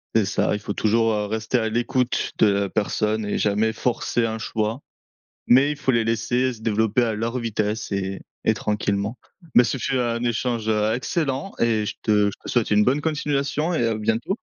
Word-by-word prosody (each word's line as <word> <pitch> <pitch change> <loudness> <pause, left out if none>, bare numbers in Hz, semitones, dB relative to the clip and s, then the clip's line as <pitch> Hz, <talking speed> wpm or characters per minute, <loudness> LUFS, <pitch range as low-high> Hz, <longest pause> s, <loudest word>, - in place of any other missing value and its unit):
C'est 110 -2 +4
ça. 100 - 0
Il 105 - -1
faut 100 0 -4
toujours, 115 +1 +2
heu, 105 -1 -1
rester 110 +3 -1
à 110 -1 -1
l'écoute 120 +2 0
de - - +6
la 100 -1 +1
personne 110 +1 0
et 105 - -1
jamais 105 +2 +1
forcer 120 0 0
un 110 0 -2
choix, 110 +3 -2 0.7
mais 135 +4 +5
il 150 - -3
faut 145 -2 0
les 115 -2 +2
laisser 120 +3 0
se 115 - -12
développer 110 +1 +1
à 115 -2 -1
leur 115 +3 -2
vitesse 110 -2 -2
et 95 0 -2 0.3
et - - +5
tranquillement. 105 0 -1 0.4
Mais 120 - +7
ce 120 +3 -1
fut 130 +1 -1
un 120 -1 -1
échange, 120 -1 -1
heu, 110 0 +2
excellent 140 +5 -2
et 110 -2 +1
je - - -3
te 105 -1 +3
je - - +1
te - - -8
souhaite 120 -3 +1
une 105 0 +4
bonne 135 +5 +2
continuation 150 +1 -1
et 120 -9 +1
à 115 - +1
bientôt! 115 - -1
115 Hz, 205 wpm, -23 LUFS, 105-125 Hz, 0.7 s, Mais